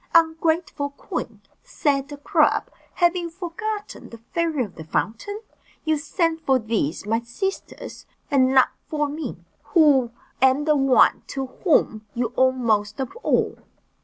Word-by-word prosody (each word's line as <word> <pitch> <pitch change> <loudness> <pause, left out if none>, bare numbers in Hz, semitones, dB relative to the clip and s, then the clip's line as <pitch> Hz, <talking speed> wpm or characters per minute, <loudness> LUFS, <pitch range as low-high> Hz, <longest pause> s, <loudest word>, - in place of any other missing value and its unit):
"Ungrateful 320 -2 +2
queen," 280 - -6 0.2
said 280 -2 -1
the 290 0 -8
crab, 285 - +2 0.2
"have 345 0 +3
you 345 -1 -3
forgotten 410 +5 -5
the 230 - -10
fairy 310 +4 -1
of 195 - -13
the 160 - -9
fountain? 230 - -3 0.4
You 315 -1 +1
sent 325 +1 -1
for 265 -3 +3
these 215 - -2
my 225 +2 0
sisters, 385 - -5 0.2
and 260 -2 +4
not 260 -1 +5 0.2
for 300 -1 0
me, 300 +3 -5 0.4
who 285 -7 +5 0.3
am 265 +2 +4
the 305 -1 +4
one 270 -2 +4
to 270 -1 -3 0.2
whom 220 - +2
you 240 0 -1
owed 260 0 +4
most 215 -4 0
of 265 0 -4
all." - - 0
285 Hz, 145 wpm, -23 LUFS, 245-330 Hz, 0.4 s, not